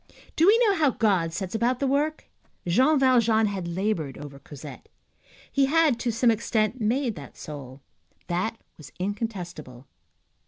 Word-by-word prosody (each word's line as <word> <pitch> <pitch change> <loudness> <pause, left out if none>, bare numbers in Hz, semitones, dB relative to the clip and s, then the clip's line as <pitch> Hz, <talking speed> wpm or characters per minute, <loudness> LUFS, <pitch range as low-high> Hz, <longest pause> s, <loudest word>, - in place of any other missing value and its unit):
Do 330 - +4
we 430 +3 +7
know 410 - +4
how 315 -6 +3
God 195 -9 +1
sets 185 +2 -5
about 235 +3 +1
the 280 - 0
work? 290 +3 0 0.4
Jean 260 - +4
Valjean 235 -4 +4
had 195 -4 -3
labored 170 -5 -2
over 140 -1 -10
Cosette. 140 0 -11 0.6
He 275 -1 +2
had, 305 -4 +3
to 240 0 -1
some 230 +1 +3
extent, 220 +1 -1
made 240 +3 0
that 140 -3 -11
soul. 140 -3 -9 0.4
That 185 +6 -2 0.2
was 140 -3 -12
incontestable. 180 - -5
215 Hz, 150 wpm, -26 LUFS, 170-255 Hz, 0.6 s, we